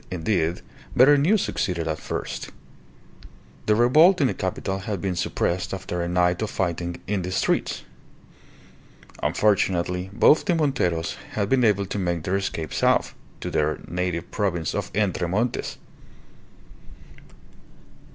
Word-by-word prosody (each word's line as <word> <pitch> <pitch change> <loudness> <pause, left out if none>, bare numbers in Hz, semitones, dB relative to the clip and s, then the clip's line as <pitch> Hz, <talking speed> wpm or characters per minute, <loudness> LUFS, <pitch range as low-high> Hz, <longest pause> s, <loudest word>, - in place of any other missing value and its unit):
Indeed, 90 -1 -1 0.3
better 135 +4 +7
news 180 +9 +3
succeeded 85 -3 -2
at 80 -1 -2
first. - - -5 1.2
The 105 - +4
revolt 155 - +5
in 140 - +3
the 125 - +1
capital 95 +1 -3
had 100 0 -4
been 90 0 -2
suppressed 90 +2 -1
after 90 -2 -4
a 85 - -2
night 90 +1 +1
of 110 - -1
fighting 85 -1 -2
in 100 -1 -1
the 90 +1 -4
streets. - - 0 1.4
Unfortunately, 90 -3 +1
both 145 +8 +4
the 180 -4 +2
Monteros 90 - 0 0.2
had 100 -2 -1
been 130 -2 +3
able 100 -3 +3
to 100 - -4
make 85 -3 -1
their 95 +3 0
escape 80 -6 -4
south, - - +2 0.3
to - - -4
their 75 0 +1
native 90 -1 -3
province 90 -6 -1
of 100 -1 -3
Entre 95 -4 +1
Montes. 110 +7 -1
95 Hz, 135 wpm, -24 LUFS, 85-110 Hz, 1.4 s, better